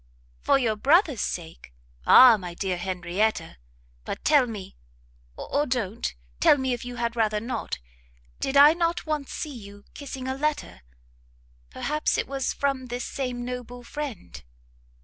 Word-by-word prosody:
"For 275 - +3
your 230 -5 0
brother's 290 - +3
sake! 165 - -6 0.3
Ah 250 -3 +9
my 180 -4 -7
dear 190 0 -2
Henrietta! 180 - -2 0.5
but - - -6
tell 290 -4 +5
me, 205 -5 -8 0.6
or 290 +1 -1
don't 225 - -2 0.2
tell - - +6
me 260 -2 -1
if 240 - -5
you 245 0 -7
had 235 -1 -2
rather 215 -2 +1
not, 235 +4 -4 0.6
did 270 +1 0
I 290 +2 +9
not 335 0 -1
once 305 -3 -3
see 300 -3 -5
you 205 -4 -12
kissing 265 -2 -7
a 260 - -1
letter? 295 - -3 0.9
perhaps 300 - -1
it - - -1
was 270 -1 -2
from 275 -2 -2
this 245 0 -4
same 250 -3 -4
noble 245 0 -7
friend?" 245 - -7
245 Hz, 150 wpm, -26 LUFS, 210-280 Hz, 0.9 s, Ah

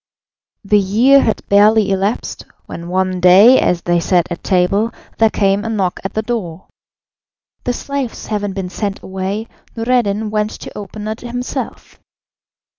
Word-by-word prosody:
The 210 +1 +3
year 235 +8 +4
had 220 - -1
barely 205 0 +4
elapsed, 195 +4 -2 0.2
when 170 - -8
one 185 0 0
day, 195 +8 +7
as 175 -1 0
they 175 0 +2
sat 175 0 +1
at 175 - -5
table, 195 +4 +1 0.3
there 225 -1 +5
came 200 -1 +1
a 225 - -3
knock 195 -5 -1
at 195 - -5
the 220 - -1
door. 190 -7 -5 1.0
The 245 - 0
slaves 275 -1 -4
having 205 -2 -3
been 190 -2 -4
sent 200 +1 -4
away, 190 +3 -4 0.3
Noureddin 225 -3 0
went 210 0 0
to - - -9
open 210 +1 -7
it 220 +1 -4
himself. 245 +1 -6
205 Hz, 150 wpm, -17 LUFS, 190-225 Hz, 1.0 s, day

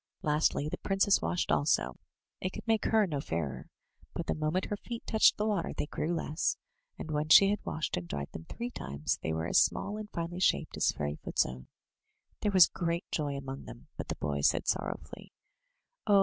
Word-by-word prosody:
Lastly, 150 -2 +2
the - - -4
princess 195 +1 +3
washed 175 - -1
also 65 - +2 0.2
— - - -21
^it 185 - -1
could - - -8
make 225 -2 +2
her 220 -2 +4
no 150 -6 -2
fairer, 80 - -3 0.5
but 170 - -3
the - - 0
moment 155 +4 0
her 205 - -3
feet 235 +2 -7
touched 220 - +5
the 210 - 0
water 205 -6 0
they - - 0
grew 155 +2 -2
less, 155 0 -1 0.4
and 155 - -6
when 150 +1 -1
she 195 +5 +8
had 210 - -2
washed 155 - -2
and 90 -1 -5
dried 70 -3 -4
them 80 - -8
three 240 - -5
times, 70 - -3
they 80 - -2
were 80 0 -1
as - - +5
small 205 +1 0
and 215 -1 -7
iSnely 170 +2 -4
shaped - - +2
as - - +3
Fairyfoot's 75 0 -1
own. 65 0 -8 0.7
There 210 - 0
was 185 -3 +9
great 170 +1 -2
joy 145 -3 -1
among 135 0 -6
them, - - -12
but - - -5
the - - -3
boy 70 -1 -2
said - - +2
sorrowfully: - - -3 0.7
"Oh! 200 -1 +6
160 Hz, 205 wpm, -31 LUFS, -, 0.7 s, was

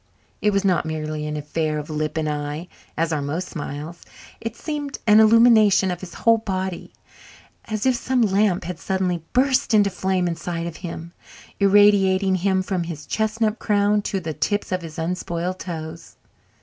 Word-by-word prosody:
It 210 - +3
was 200 0 0
not 185 -3 +2
merely 155 -1 -3
an 150 0 -3
affair 155 +1 -2
of 150 0 -5
lip 155 +1 -2
and 155 -1 0
eye, 150 +3 -3 0.3
as 165 +1 0
are 150 - -1
most 160 +6 -3
smiles; 150 +2 -6 0.4
it 230 0 -5
seemed 290 0 -4
an 210 -1 +6
illumination 220 -4 +6
of 175 - -4
his 185 -3 -9
whole 230 -1 +3
body, 190 -4 -4 0.7
as 215 0 -3
if 260 - +4
some 250 0 +1
lamp 200 -2 +2
had 175 -1 -6
suddenly 180 -3 -1
burst 255 -2 +2
into 205 -2 +4
flame 185 -1 0
inside 170 0 -3
of 170 -2 -6
him, 170 -1 -7 0.5
irradiating 195 -1 +4
him 190 +1 +1
from 185 -3 -2
his 160 -3 -7
chestnut 220 0 -1
crown 205 0 +2
to 195 -1 -2
the 160 -3 -5
tips 205 +6 -1
of 185 0 -1
his 165 -2 -9
unspoiled 175 +1 -3
toes. 165 -2 -7
185 Hz, 170 wpm, -22 LUFS, 165-205 Hz, 0.7 s, an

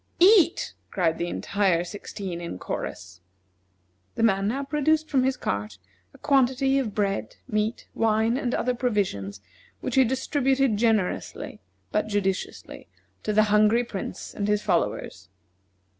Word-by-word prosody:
"Eat!" 385 +4 +5 0.2
cried 165 -4 0
the 170 - -1
entire 190 -2 +1
sixteen 185 -1 -6
in 170 - -5
chorus. 90 0 -6 0.9
The - - -1
man 195 -3 +3
now 270 +6 -1
produced 305 +2 +1
from 270 -3 +3
his 265 0 +1
cart 100 0 -3 0.3
a - - -17
quantity 270 -1 +2
of 220 -7 -3
bread, 195 - -1
meat, 215 0 -1
wine, 225 +1 +2
and 255 -2 -1
other 250 - 0
provisions, 190 - -1 0.4
which 255 - -4
he 265 0 +6
distributed 265 0 +1
generously, 220 -4 -1 0.3
but - - 0
judiciously, 200 -2 -3 0.3
to 215 - -2
the 215 +1 +5
hungry 215 +3 +5
Prince 205 -5 -6
and 205 - -2
his 210 0 +1
followers. 90 0 -1
215 Hz, 135 wpm, -26 LUFS, 190-265 Hz, 0.9 s, he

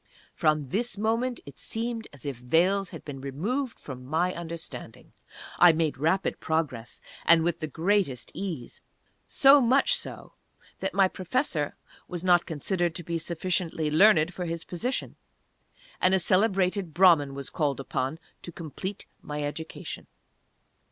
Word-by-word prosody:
From 155 -3 +1
this 230 - 0
moment 230 +4 0
it 140 - -12
seemed 230 0 -3
as 140 0 -10
if 140 -2 -3
veils 175 +10 +2
had - - -10
been 135 -3 -7
removed 215 - -3
from 130 -3 -8
my 165 +7 0
understanding. 170 -1 -7 0.5
I 175 -2 +8
made 155 -3 -1
rapid 180 +6 +1
progress, 145 -8 -2 0.2
and 165 -1 +6
with 170 0 0
the 155 - -3
greatest 165 -3 0
ease. 170 -11 -5 0.5
So 275 +1 +7
much 265 - +4
so, 485 - -7 0.5
that 190 -1 -3
my 195 -1 +5
Professor 185 - -1 0.3
was 175 -1 -5
not 175 -2 +4
considered 175 +1 -1
to 175 - -4
be 170 +1 -2
sufficiently 165 -2 -1
learned 170 0 +5
for 180 0 -4
his 165 0 -4
position, 245 +9 -3 0.8
and 185 +1 +5
a - - +3
celebrated 185 -2 +1
Brahman 165 -7 +5
was 140 -1 -5
called 145 -4 0
upon 135 +2 -2 0.2
to 175 - -8
complete 175 +5 -6 0.2
my 150 0 -4
education. 160 +2 -6
170 Hz, 145 wpm, -27 LUFS, 150-195 Hz, 0.8 s, I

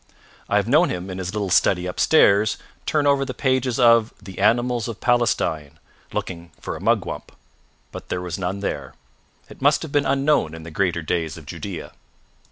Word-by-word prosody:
I - - +1
have - - +2
known - - +4
him, 90 +1 -4
in 90 - -6
his 95 0 -3
little 100 -3 -3
study 90 0 +3
upstairs, 100 - +3 0.3
turn 150 -2 +1
over 140 -1 +3
the 130 -2 -5
pages 130 -2 0
of 115 -2 +5
the 95 -2 -10
"Animals 120 +2 +2
of 115 -3 -6
Palestine," 100 - 0 0.3
looking 85 -2 -5
for - - -5
a - - -9
mugwump. - - -1 0.6
But - - -9
there 90 - -1
was 90 0 -5
none 95 +2 -3
there. 70 -9 -4 0.5
It - - -15
must 145 +3 +3
have 160 - -7
been 145 0 +1
unknown 135 - +1
in 80 - -10
the 80 - -9
greater 85 -1 0
days 80 -1 -2
of 80 - -12
Judea. 85 +4 -7
100 Hz, 180 wpm, -22 LUFS, 90-125 Hz, 0.6 s, of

